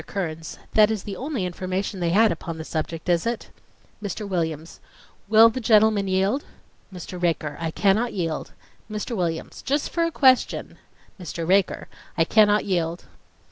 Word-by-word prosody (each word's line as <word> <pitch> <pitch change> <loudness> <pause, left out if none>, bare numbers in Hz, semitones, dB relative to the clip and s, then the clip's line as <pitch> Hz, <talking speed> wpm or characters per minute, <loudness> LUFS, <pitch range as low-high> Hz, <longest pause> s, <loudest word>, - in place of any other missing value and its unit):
KEARNS: 165 -4 -5 0.2
That 215 -1 +6
is 220 -3 -2
the 200 - -6
only 265 -6 -3
information 185 +2 -3
they 170 -1 0
had 215 +5 +4
upon 165 0 -5
the 160 - -5
subject, 160 +1 -4
is 175 +3 +2
it? 235 -1 -4 0.5
MR. 205 +1 -4
WILLIAMS:... 165 -4 -3 0.5
Will 225 +1 +8
the 255 - -4
gentleman 215 -3 +4
yield? 195 +9 +1 0.5
MR. 180 0 -8
RAKER: 160 -4 0
I 165 -1 -2
cannot 205 +7 +2
yield. 165 -5 -3 0.4
MR. 215 +2 -4
WILLIAMS: 170 -4 -3
Just 285 +2 -1
for 335 - 0
a 335 - +1
question. 260 -5 +2 0.4
MR. 170 -2 -5
RAKER: 190 +1 +2 0.3
I 165 - +5
cannot 210 +3 +4
yield 175 -3 -1
190 Hz, 155 wpm, -24 LUFS, 170-215 Hz, 0.5 s, Will